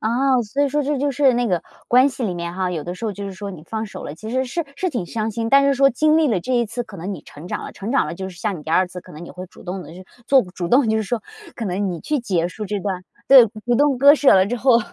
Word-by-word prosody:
啊， 255 +3 +2
所 270 +7 -1
以 285 - +2
说 295 +2 0
这 290 +1 -1
就 285 +2 0
是 275 0 +3
那 245 0 +1
个 180 -2 +1 0.3
关 255 +3 +5
系 260 -1 -7
里 195 - -1
面 170 0 -5
哈， 185 -1 -1
有 160 -4 -4
的 175 - -5
时 185 - -8
候 215 - -1
就 200 +1 -7
是 195 - -5
说 200 +2 -7
你 170 -4 -11
放 220 +4 -4
手 - - -9
了 145 - -6
其 215 +6 -8
实 260 +2 0
是 315 +6 -3
是 370 - -1
挺 240 - -3
伤 220 +2 -3
心， 225 +1 -3
但 275 +2 +6
是 280 - +3
说 275 +1 +4
经 305 +5 +3
历 310 -3 +3
了 215 - +1
这 255 - -4
一 240 -1 +3
次 235 +3 -4
可 200 - -12
能 185 +4 -5
你 170 - -7
成 150 +4 -12
长 - - -4
了。 - - -8
成 205 +3 -6
长 275 - +2
了， 155 - -5
就 190 +2 -6
是 180 - -12
像 200 +1 -2
你 150 - -11
第 160 - -7
2 185 +2 +4
次 180 0 -9
可 180 - -17
能 155 +3 -9
你 - - -10
会 180 0 -8
主 - - -17
动 185 0 -5
地 165 - -12
去 185 +1 -11 0.2
做 270 -2 +5
主 180 -2 -6
动 250 +2 +4
就 220 - +2
是 220 - 0
说 225 +2 -2 0.4
可 235 - -4
能 195 0 -1
你 170 -2 -5
去 300 - -1
结 180 -7 0
束 210 +4 -7
这 205 0 -3
段 190 -2 -3 0.3
对， 265 -3 +9 0.2
主 245 - +2
动 280 -1 +3
割 285 +2 +8
舍 285 -6 +5
了 190 0 +5
之 245 +4 -2
后， 245 -1 +4
220 Hz, 345 characters per minute, -21 LUFS, 185-260 Hz, 0.4 s, 对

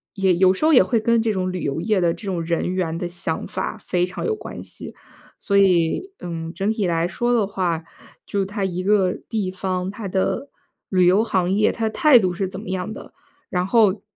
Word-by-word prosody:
也 190 -2 +3
有 185 +1 +5
时 190 - -5
候 315 - +5
也 255 - +8
会 235 - +1
跟 230 +1 +2
这 220 -2 0
种 185 -1 -1
旅 180 -1 -4
游 140 +3 -2
业 210 -1 +1
的 170 -1 +2
这 225 - -12
种 185 -4 -2
人 170 +2 -1
员 165 -3 -1
的 175 0 -3
想 170 -2 -3
法 - - -4
非 180 -3 -1
常 185 - -5
有 445 - +1
关 - - -8
系。 - - -8 0.4
所 200 -1 0
以， 190 - +2
嗯， 165 -1 -5
整 200 +2 0
体 215 -4 -1
来 165 0 +1
说 240 +7 0
的 220 -4 +3
话， 175 -5 -2 0.4
就 200 -1 -1
它 205 +1 -4
一 185 -1 -2
个 190 -2 +2
地 210 -5 -2
方， 185 0 -3
它 205 -1 -6
的 190 +9 -1 0.4
旅 185 -2 +3
游 190 +4 +5
行 185 -5 0
业， 210 +2 +3
它 225 -1 -1
态 295 +2 +5
度 185 -5 +2
是 190 +1 -2
怎 190 - -8
么 205 -1 -8
样 190 +3 -3
的。 - - -11 0.4
然 180 0 -1
后， 215 -3 +3
190 Hz, 235 characters per minute, -22 LUFS, 180-215 Hz, 0.4 s, 也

